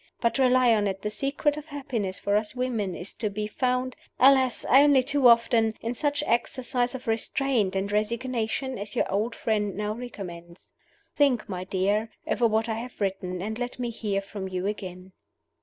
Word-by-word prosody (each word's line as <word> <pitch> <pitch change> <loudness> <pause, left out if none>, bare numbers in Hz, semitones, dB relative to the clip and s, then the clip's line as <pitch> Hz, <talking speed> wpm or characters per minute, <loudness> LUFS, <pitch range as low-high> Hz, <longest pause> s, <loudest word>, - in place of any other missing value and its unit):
But, 235 +3 +1
rely 255 -2 +5
on 210 -2 +2
it, 195 -1 -4
the 210 - -2
secret 280 +5 0
of 300 0 -8
happiness 250 -10 -3
for 200 0 0
us 210 +3 -1
women 230 -7 -1
is 180 - -6
to 215 - -2
be 210 +1 -3
found 250 +3 -1 0.2
(alas! 260 -1 +5
only 275 -1 +6
too 280 -1 +3
often) 230 -1 +4
in 230 +1 -3
such 290 +3 0
exercise 245 +1 0
of 260 - -8
restraint 225 -2 0
and 195 +1 -1
resignation 235 +3 -1
as 205 +1 -6
your - - +2
old 215 +4 -1
friend 210 -3 -1
now 210 0 -1
recommends. 180 -7 -9 0.4
Think, 270 -7 +2
my 185 -3 -5
dear, 200 +4 0 0.2
over 235 - +2
what 220 +1 +1
I 225 -1 -2
have 245 +2 -9
written, 190 -2 -2
and 220 +3 -4
let 245 0 -4
me 245 -2 -3
hear 205 -3 -2
from 195 -1 -6
you 185 0 -3
again." 185 -3 -5
225 Hz, 180 wpm, -26 LUFS, 200-255 Hz, 0.4 s, only